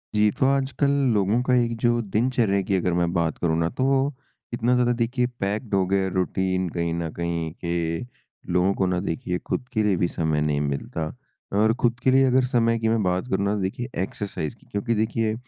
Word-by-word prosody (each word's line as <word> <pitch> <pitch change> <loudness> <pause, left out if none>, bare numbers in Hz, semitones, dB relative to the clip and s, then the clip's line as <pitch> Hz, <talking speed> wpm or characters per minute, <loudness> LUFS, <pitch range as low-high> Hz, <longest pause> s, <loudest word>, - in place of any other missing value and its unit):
जी। 105 0 +4
तो 130 - +4
आजकल 135 0 +1 0.2
लोगों 105 +3 +2
का 125 - +1
एक 120 -1 +1
जो 120 0 +3
दिनचर्या 110 -4 +2
की 95 +1 -1
अगर 90 -1 0
मैं 85 0 +1
बात 85 -2 0
करूँ 80 -2 0
ना 80 0 +1
तो, 135 +2 +1 0.4
इतना 120 +1 +1
ज़्यादा 125 0 +3
देखिए 125 +1 +1
पैक्ड 105 +3 -2
हो 95 -1 +3
गया 95 0 +1
रूटीन 95 0 0
कहीं 85 0 -2
न 85 -1 -2
कहीं 85 -2 -2
कि, 85 +2 -2 0.4
लोगों 90 +2 +2
को 95 - 0
ना 90 -1 0
देखिए 90 0 -2
खुद - - -1
के 110 -3 +2
लिए 105 -2 +2
भी 85 - +2
समय 80 -3 -1
नहीं 75 -1 +1
मिलता। 70 +2 -3 0.5
और 110 +1 +4
खुद 120 0 +2
के 130 - +4
लिए 135 +1 +5
अगर 130 0 +3
समय 115 -2 +2
की 115 - 0
मैं 110 0 +2
बात 90 +4 0
करूँ 100 -5 0
ना, 100 - +1
तो 105 - -2
देखिए 120 +6 -3
एक्सरसाइज़ 95 -5 -4
की - - -25
क्योंकि, 115 +3 -1
देखिए 110 0 0
100 Hz, 210 wpm, -24 LUFS, 85-120 Hz, 0.5 s, लिए